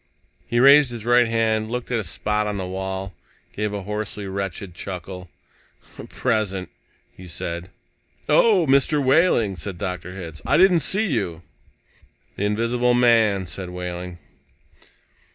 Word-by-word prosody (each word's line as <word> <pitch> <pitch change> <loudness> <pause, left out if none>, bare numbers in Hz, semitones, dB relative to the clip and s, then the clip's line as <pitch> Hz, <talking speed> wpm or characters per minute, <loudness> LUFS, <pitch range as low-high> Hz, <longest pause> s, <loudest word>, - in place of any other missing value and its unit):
He 120 - 0
raised 140 +1 +7
his 115 -2 -7
right 120 0 +4
hand, 110 -1 0
looked 125 +1 -4
at 120 - +1
a - - -3
spot 105 +4 -1
on 105 -1 -3
the 95 - -3
wall, 95 +1 -5 0.4
gave 105 0 -2
a 100 -1 -5
hoarsely 105 0 -5
wretched 95 -1 -5
chuckle. 90 0 -7 0.8
"Present," 105 -7 -1 0.4
he 95 - -12
said. 85 +1 -5 0.6
"Oh, 205 -7 +4
Mr. 140 +2 +3
Wehling," 130 - +3
said 90 +2 -6
Dr. 90 -2 -5
Hitz, 85 -5 -8
"I - - +2
didn't 180 -1 +5
see 195 +8 +3
you." 90 - -2 0.9
"The 100 - -2
invisible 120 +4 +1
man," 115 -5 +3
said 90 +1 -7
Wehling. 90 0 -6
105 Hz, 135 wpm, -22 LUFS, 95-120 Hz, 0.9 s, raised